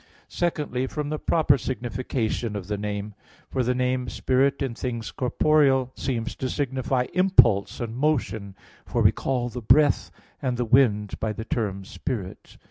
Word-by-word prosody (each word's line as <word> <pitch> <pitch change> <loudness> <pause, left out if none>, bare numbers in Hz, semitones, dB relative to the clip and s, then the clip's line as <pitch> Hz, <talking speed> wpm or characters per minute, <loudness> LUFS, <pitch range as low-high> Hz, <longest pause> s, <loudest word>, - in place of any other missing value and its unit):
Secondly, 150 -7 -1
from 150 +1 -4
the 155 0 -3
proper 150 -4 +3
signification 120 -3 -2
of 100 -3 -4
the 105 +2 -2
name. 105 0 -4 0.4
For 130 - 0
the 125 +1 +1
name 125 0 0
spirit 135 +2 +1
in 130 -3 -2
things 115 -2 -4
corporeal 135 0 +2
seems 120 -3 -3
to 130 - -2
signify 130 -2 -1
impulse 165 - +4
and 115 -1 -4
motion; 110 -9 -1 0.3
for - - -1
we - - +6
call 125 -2 -2
the 120 +1 -6
breath 145 +6 +4 0.3
and 130 -3 -1
the 120 - 0
wind 110 -4 +3
by 110 -1 -1
the 110 +2 -6
term 100 -5 -2
spirit. 110 -3 -6
125 Hz, 155 wpm, -25 LUFS, 110-135 Hz, 0.4 s, we